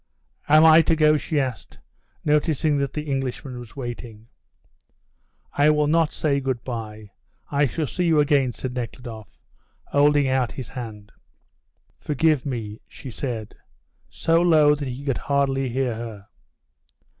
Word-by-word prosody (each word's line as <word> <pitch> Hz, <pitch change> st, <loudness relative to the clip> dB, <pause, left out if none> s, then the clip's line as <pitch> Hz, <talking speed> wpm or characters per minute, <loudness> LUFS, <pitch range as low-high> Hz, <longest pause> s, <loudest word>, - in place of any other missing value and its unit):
"Am 155 Hz, +2 st, +7 dB
I 160 Hz, +1 st, +8 dB
to 165 Hz, 0 st, +2 dB
go?" 155 Hz, -1 st, +4 dB
she 150 Hz, 0 st, -1 dB
asked, 125 Hz, -, -4 dB, 0.5 s
noticing 150 Hz, -1 st, +2 dB
that 140 Hz, -1 st, -1 dB
the 150 Hz, -, -4 dB
Englishman 135 Hz, -2 st, -4 dB
was 120 Hz, +1 st, -12 dB
waiting. 120 Hz, -4 st, -8 dB, 1.2 s
"I 145 Hz, +1 st, +4 dB
will 150 Hz, 0 st, +3 dB
not 160 Hz, +1 st, +2 dB
say 140 Hz, -3 st, 0 dB
good 130 Hz, -3 st, -3 dB
bye; 110 Hz, -4 st, -7 dB, 0.4 s
I 145 Hz, 0 st, +3 dB
shall 155 Hz, +4 st, -2 dB
see 180 Hz, +5 st, -2 dB
you 160 Hz, -3 st, +3 dB
again," 140 Hz, -3 st, +3 dB
said 125 Hz, +1 st, -6 dB
Nekhludoff, 120 Hz, -3 st, -8 dB, 0.4 s
holding 145 Hz, 0 st, +3 dB
out 130 Hz, -3 st, 0 dB
his 130 Hz, -4 st, -7 dB
hand. 110 Hz, -5 st, -8 dB, 0.9 s
"Forgive 150 Hz, -1 st, +1 dB
me," 110 Hz, -4 st, -5 dB
she 130 Hz, -, -10 dB
said 115 Hz, -3 st, -5 dB, 0.6 s
so 165 Hz, +1 st, +1 dB
low 155 Hz, -4 st, +5 dB
that 145 Hz, -1 st, -4 dB
he 130 Hz, +3 st, -6 dB
could 135 Hz, -3 st, -1 dB
hardly 135 Hz, -2 st, 0 dB
hear 125 Hz, 0 st, -1 dB
her. 110 Hz, -3 st, -8 dB
135 Hz, 145 wpm, -23 LUFS, 120-150 Hz, 1.2 s, I